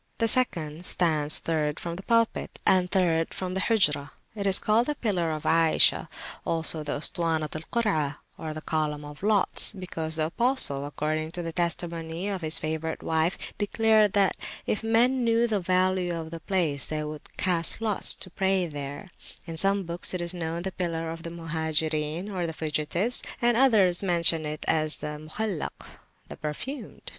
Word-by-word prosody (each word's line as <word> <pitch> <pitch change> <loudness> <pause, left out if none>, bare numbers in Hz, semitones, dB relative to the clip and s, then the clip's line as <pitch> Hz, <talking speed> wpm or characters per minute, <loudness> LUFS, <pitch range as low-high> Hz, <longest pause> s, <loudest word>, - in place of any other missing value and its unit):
The 230 - +1
second 170 -10 +3
stands 155 -4 +3
third 150 -2 -2
from 170 -1 -5
the 185 - -8
Pulpit, 230 +2 0
and 185 -1 +3
third 170 -4 0
from 185 -1 -4
the 190 - -2
Hujrah. 170 -10 +2 0.2
It 200 -2 -3
is 195 0 +5
called 225 +3 +2
the 295 - -1
Pillar 185 - -1
of 155 -1 -4
Ayishah, 165 -1 +4 0.4
also 165 -1 +3
the 150 - -3
Ustuwanat 160 -1 0
al 155 - -4
Kurah, 155 -12 0 0.2
or 155 -1 -6
the 155 - -7
Column 150 -2 -2
of 145 0 -11
Lots, 210 0 +3
because 165 -5 -5
the 155 -1 +1
Apostle, 165 - +3
according 155 +2 -3
to 175 -2 -4
the 165 - -4
testimony 170 +1 -3
of 195 -2 -4
his 155 0 +4
favourite 160 +1 -4
wife, 160 +2 -1
declared 215 0 +2
that 200 -2 +2 0.3
if 210 - -2
men 240 +3 +2
knew 230 0 +2
the 215 -3 0
value 185 -1 0
of 160 -1 -6
the 165 - -6
place, 165 -6 -1
they 155 0 -3
would 150 0 -9
cast 170 -3 +1
lots 220 -3 +4
to 185 - -4
pray 190 0 +1
there: 145 +2 -7 0.4
in 165 -1 -7
some 195 +4 +3
books 170 +1 -3
it - - -3
is 170 +1 -1
known 165 -2 -4
as - - -9
the 190 - -3
Pillar 165 -3 -3
of 165 0 -8
the 170 - -7
Muhajirin 160 0 -1
or 180 -5 -3
Fugitives, 160 +9 +1 0.2
and 240 -1 +2
others 215 -9 +4
mention 170 -4 +2
it 150 0 -5
as 155 -1 +1
Al 150 0 -5
Mukhallak 170 +3 -5 0.4
the - - -10
Perfumed. 230 - -6
170 Hz, 175 wpm, -26 LUFS, 155-195 Hz, 0.4 s, is